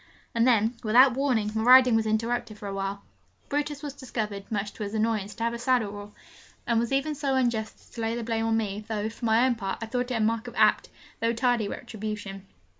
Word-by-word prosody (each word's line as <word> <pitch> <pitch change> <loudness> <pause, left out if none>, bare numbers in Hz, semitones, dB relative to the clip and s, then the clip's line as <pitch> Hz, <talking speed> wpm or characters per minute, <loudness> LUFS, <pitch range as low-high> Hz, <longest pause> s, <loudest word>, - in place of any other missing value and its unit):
And 230 +1 +3
then, 225 -1 +3
without 245 +4 +6
warning, 245 -6 0
my 220 - -1
riding 250 0 +7
was 220 -1 +1
interrupted 220 0 -1
for 205 - -7
a 195 - -4
while. 195 +1 -4 0.5
Brutus 295 0 -2
was 290 -2 -5
discovered, 215 -7 -5
much 205 -1 -2
to - - -12
his 205 +1 -4
annoyance, 215 -2 -1
to 230 - -4
have 230 0 0
a 235 - -5
saddle 240 -4 +1
raw, 205 0 -8 0.6
and 235 -2 +2
was 235 +1 -1
even 275 +3 0
so 280 -2 -1
unjust 235 -4 0
as - - -22
to 230 - -7
lay 225 +1 -1
the 240 - -4
blame 225 0 -1
on 225 0 +2
me, 210 -1 -3
though, 215 -1 -2
for 235 - -7
my 225 +2 +4
own 260 - +3
part, 195 -4 -4
I 225 - -4
thought 245 +2 -2
it 250 - -1
a - - 0
mark 225 +2 0
of 240 - -9
apt, - - +3 0.3
though 230 0 +1
tardy, 240 -2 +1
retribution. 200 -2 -6
225 Hz, 235 wpm, -27 LUFS, 215-245 Hz, 0.6 s, riding